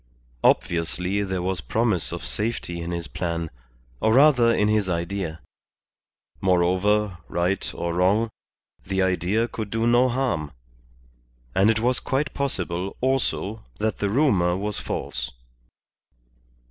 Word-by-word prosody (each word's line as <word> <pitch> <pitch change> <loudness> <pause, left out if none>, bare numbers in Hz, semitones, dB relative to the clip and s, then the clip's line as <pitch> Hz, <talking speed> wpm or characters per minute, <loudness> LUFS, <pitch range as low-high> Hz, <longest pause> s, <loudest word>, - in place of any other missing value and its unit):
Obviously 90 +4 +1
there 95 -3 -2
was 95 -2 -1
promise 110 -2 +1
of - - -5
safety 105 -6 -2
in 85 - -4
his 85 -1 -3
plan, 85 +1 -3 0.5
or 110 +1 +3
rather 130 -4 +6
in 105 -2 +2
his 105 -3 +2
idea. 85 -2 -3 1.0
Moreover, 95 +2 +2
right 90 +3 0
or 85 0 -2
wrong, 100 +6 +2 0.5
the 95 0 0
idea 95 +5 +1
could 110 -3 -5
do 115 +2 0
no 120 +2 +4
harm. 120 - -1 1.0
And 95 +3 +4
it 110 0 +3
was 125 +1 +2
quite 140 +2 -1
possible, 95 -9 -2
also, 120 -5 -1
that 110 0 -1
the 100 - 0
rumour 100 - +3
was 105 +1 -3
false. - - -3
100 Hz, 125 wpm, -24 LUFS, 90-115 Hz, 1.0 s, rather